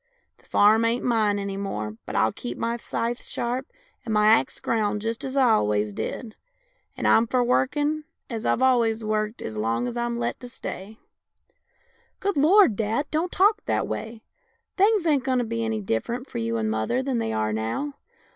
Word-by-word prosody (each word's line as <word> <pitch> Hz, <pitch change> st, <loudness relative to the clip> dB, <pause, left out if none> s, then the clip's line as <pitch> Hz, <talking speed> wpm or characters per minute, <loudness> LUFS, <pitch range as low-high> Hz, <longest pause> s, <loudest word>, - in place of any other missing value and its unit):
The -, -, -25 dB
farm 215 Hz, +2 st, +5 dB
ain't 230 Hz, +2 st, +1 dB
mine 220 Hz, -4 st, +2 dB
any 200 Hz, -1 st, -4 dB
more, 105 Hz, -, -4 dB
but -, -, -5 dB
I'll 110 Hz, 0 st, +3 dB
keep 120 Hz, +2 st, -6 dB
my 235 Hz, +1 st, -1 dB
scythe 235 Hz, +1 st, -3 dB
sharp 250 Hz, +3 st, -3 dB, 0.4 s
and 225 Hz, -, -5 dB
my 210 Hz, 0 st, +3 dB
axe 225 Hz, -, +3 dB
ground 210 Hz, -2 st, 0 dB
just 225 Hz, 0 st, -3 dB
as 265 Hz, 0 st, -4 dB
I 260 Hz, -4 st, +5 dB
always 105 Hz, -, +1 dB
did, 220 Hz, -, -5 dB, 0.6 s
and -, -, 0 dB
I'm 225 Hz, +1 st, +5 dB
for 250 Hz, +1 st, +2 dB
workin' 290 Hz, +5 st, +1 dB, 0.2 s
as 230 Hz, -3 st, -5 dB
I've 255 Hz, -, +1 dB
always 230 Hz, -3 st, +3 dB
worked 215 Hz, +1 st, -2 dB
as 110 Hz, -, -5 dB
long 115 Hz, -, 0 dB
as 245 Hz, -, -5 dB
I'm 240 Hz, 0 st, -1 dB
let 235 Hz, 0 st, -2 dB
to 245 Hz, -, -9 dB
stay." 215 Hz, -4 st, -7 dB, 0.6 s
" -, -, -39 dB
Good 400 Hz, -2 st, -1 dB
Lord, 315 Hz, -, +5 dB
dad, 225 Hz, +7 st, -1 dB
don't 325 Hz, +3 st, 0 dB
talk 420 Hz, +3 st, +3 dB
that -, -, 0 dB
way. 225 Hz, 0 st, -5 dB, 0.5 s
Things 405 Hz, -1 st, +3 dB
ain't 290 Hz, -5 st, +2 dB
going 260 Hz, -1 st, +1 dB
to 245 Hz, -, +1 dB
be 230 Hz, 0 st, -2 dB
any 225 Hz, -1 st, -1 dB
different 235 Hz, -, -2 dB
for -, -, -5 dB
you 115 Hz, 0 st, -1 dB
and 110 Hz, -1 st, -1 dB
mother 110 Hz, -, 0 dB
than 260 Hz, -3 st, -1 dB
they 110 Hz, -, -1 dB
are 110 Hz, -1 st, -1 dB
now. 115 Hz, -, -2 dB
230 Hz, 195 wpm, -25 LUFS, 205-255 Hz, 0.6 s, farm